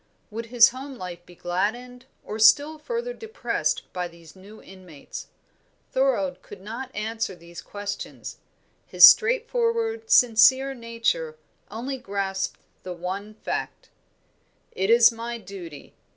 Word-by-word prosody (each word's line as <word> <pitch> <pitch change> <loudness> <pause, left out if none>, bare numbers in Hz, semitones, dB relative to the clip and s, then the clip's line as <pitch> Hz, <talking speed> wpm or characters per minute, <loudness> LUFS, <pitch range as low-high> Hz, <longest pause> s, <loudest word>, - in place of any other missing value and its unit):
Would 230 +2 -6
his 235 -1 +6
home 265 +2 -9
life 180 -5 -8
be 175 - -15
gladdened 240 +9 -3 0.2
or 215 - -6
still 290 +8 +5
further 480 +7 -4
depressed 445 0 -2
by 180 -1 -3
these 170 -1 -17
new 200 +3 -14
inmates? 180 -6 -11 0.6
Thorold - - 0
could 205 - -12
not 230 +7 -7
answer 220 -2 -3
these 170 0 -12
questions; 205 0 -7 0.5
his - - +9
straightforward, 460 -1 +3
sincere 260 - +5
nature 230 -10 -2 0.3
only 255 +5 -5
grasped 195 -4 -3 0.2
the 185 - -6
one 190 +5 -6
fact. - - -5 0.8
"It 190 +2 -2
is 235 +1 +7
my 235 +1 -6
duty. 185 -8 -11
225 Hz, 125 wpm, -25 LUFS, 190-270 Hz, 0.8 s, his